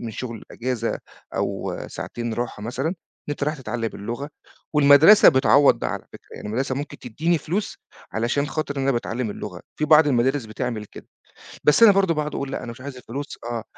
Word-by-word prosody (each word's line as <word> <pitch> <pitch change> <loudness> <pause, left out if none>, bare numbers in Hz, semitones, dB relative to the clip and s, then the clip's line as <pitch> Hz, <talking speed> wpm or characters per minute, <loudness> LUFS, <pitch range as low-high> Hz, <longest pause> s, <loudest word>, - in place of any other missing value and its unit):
من 120 - -5
الشغل 115 0 -6
إجازة، 120 -2 -2 0.4
أو - - -2
ساعتين 120 -1 -5
راحة 120 -3 -4
مثلًا 125 +6 -2
إن 175 - -2 0.4
أنت 145 - -3
رايح 150 +1 -1
تتعلّم 120 -4 -3
اللغة، 120 +7 -5 0.5
والمدرسة 150 +8 +8
بتعوّض 140 0 +5
ده - - -2
على - - -5
فكرة، - - -14
يعني - - -8
المدرسة 130 +4 -1
ممكن 145 +3 -6
تدّيني 155 +8 -1
فلوس، 180 +8 -3 0.3
علشان 120 +7 0
خاطر 145 0 -3
أنا 135 0 +1
باتعلّم 120 -1 -2
اللغة، 90 -3 -7 0.2
في 150 - 0
بعض 155 0 +6
المدارس 130 0 +2
بتعمل 110 0 -4
كده، - - -13 0.6
بس 150 +9 +5
أنا 225 - +10
برضه 195 -3 +3
باقعد 150 -1 -3
أقول 140 -1 -3
لأ، - - -4
أنا 120 - -6
مش 125 +2 -12
عايز 140 -1 -7
الفلوس، 135 +4 -7
آه، 120 -2 -3
130 Hz, 185 wpm, -23 LUFS, 115-150 Hz, 0.6 s, أنا